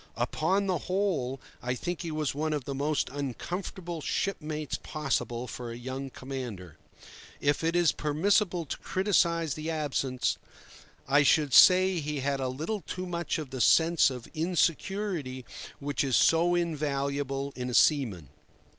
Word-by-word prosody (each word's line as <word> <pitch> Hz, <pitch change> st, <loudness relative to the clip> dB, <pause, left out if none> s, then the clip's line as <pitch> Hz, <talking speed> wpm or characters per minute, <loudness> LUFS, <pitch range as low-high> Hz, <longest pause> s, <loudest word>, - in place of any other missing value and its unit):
Upon 200 Hz, +2 st, +1 dB
the 185 Hz, -4 st, 0 dB
whole, 175 Hz, -10 st, 0 dB, 0.2 s
I 125 Hz, +1 st, -1 dB
think 175 Hz, +6 st, -4 dB
he 170 Hz, -, -4 dB
was 155 Hz, -2 st, -1 dB
one 155 Hz, +2 st, -1 dB
of 145 Hz, -4 st, -3 dB
the 140 Hz, -, -3 dB
most 145 Hz, +2 st, 0 dB
uncomfortable 170 Hz, -, -5 dB
shipmates 155 Hz, -5 st, -2 dB
possible 130 Hz, -5 st, -2 dB
for 120 Hz, -1 st, -6 dB
a 115 Hz, -, -7 dB
young 130 Hz, +2 st, -5 dB
commander. 120 Hz, -, -7 dB, 0.6 s
If 145 Hz, +2 st, +1 dB
it 165 Hz, +1 st, +1 dB
is 175 Hz, -2 st, +4 dB
permissible 175 Hz, +3 st, +1 dB
to -, -, -5 dB
criticise 170 Hz, -5 st, +1 dB
the 155 Hz, +2 st, -5 dB
absent, 140 Hz, -5 st, -1 dB, 0.7 s
I 145 Hz, +2 st, +5 dB
should 145 Hz, -1 st, +3 dB
say 185 Hz, -1 st, +7 dB
he 150 Hz, -2 st, -3 dB
had 140 Hz, 0 st, 0 dB
a 130 Hz, -, -1 dB
little 160 Hz, +12 st, -3 dB
too 185 Hz, +1 st, -5 dB
much 175 Hz, 0 st, -2 dB
of 150 Hz, -5 st, -6 dB
the 130 Hz, -2 st, -3 dB
sense 165 Hz, +5 st, +5 dB
of 125 Hz, -3 st, -7 dB
insecurity 165 Hz, -4 st, -1 dB, 0.3 s
which 145 Hz, 0 st, -1 dB
is 135 Hz, -3 st, +2 dB
so 170 Hz, +2 st, +4 dB
invaluable 140 Hz, -4 st, -1 dB
in 125 Hz, 0 st, -4 dB
a 125 Hz, -, -2 dB
seaman. 110 Hz, -, +3 dB
150 Hz, 150 wpm, -29 LUFS, 135-170 Hz, 0.7 s, say